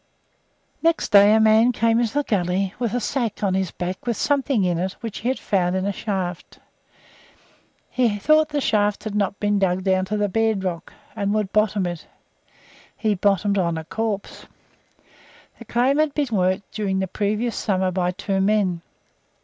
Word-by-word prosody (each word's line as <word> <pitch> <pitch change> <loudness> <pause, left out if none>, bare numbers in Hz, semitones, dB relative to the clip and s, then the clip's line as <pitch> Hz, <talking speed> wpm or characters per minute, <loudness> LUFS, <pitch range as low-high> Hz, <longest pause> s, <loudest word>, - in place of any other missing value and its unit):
Next 330 0 +1
day 205 0 +7
a - - +4
man 220 +2 +5
came 230 0 +2
up 235 - +1
the 290 +6 -1
gully 190 -3 -1
with 240 -2 -1
a - - +1
sack 235 -3 -2
on 195 -2 +1
his 190 -2 0
back 180 +7 -6
with 235 - 0
something 275 -6 +1
in 175 -2 0
it 185 +2 -2
which 230 -3 -6
he 235 - -4
had 260 - 0
found 185 -3 0
in 190 0 -1
a 200 - 0
shaft. 185 -4 -4 1.3
He 235 -5 0
thought 310 +8 +3
the 295 -1 -1
shaft 205 -4 +1
had 215 - -5
not 200 -1 -1
been 205 -1 +1
dug 185 -1 0
down 190 -1 +1
to 210 +2 -2
the 205 0 +1
bedrock, 190 -5 -1 0.2
and 200 -1 -1
he 205 - 0
would 210 -2 -2
bottom 210 -2 +2
it. 175 -2 -5 0.9
He 215 -2 +1
bottomed 200 +1 +1
on 170 -2 0
a 160 - -5
corpse. 215 +2 -4 1.1
The 235 - -11
claim 255 +6 +1
had 310 -2 +1
been 290 -4 0
worked 185 +1 0
during 205 -3 -2
the 190 - 0
previous 210 +5 -2
summer 190 -2 0
by 180 -1 0
two 195 +1 -2
men. 195 -4 +1
205 Hz, 180 wpm, -22 LUFS, 190-225 Hz, 1.3 s, day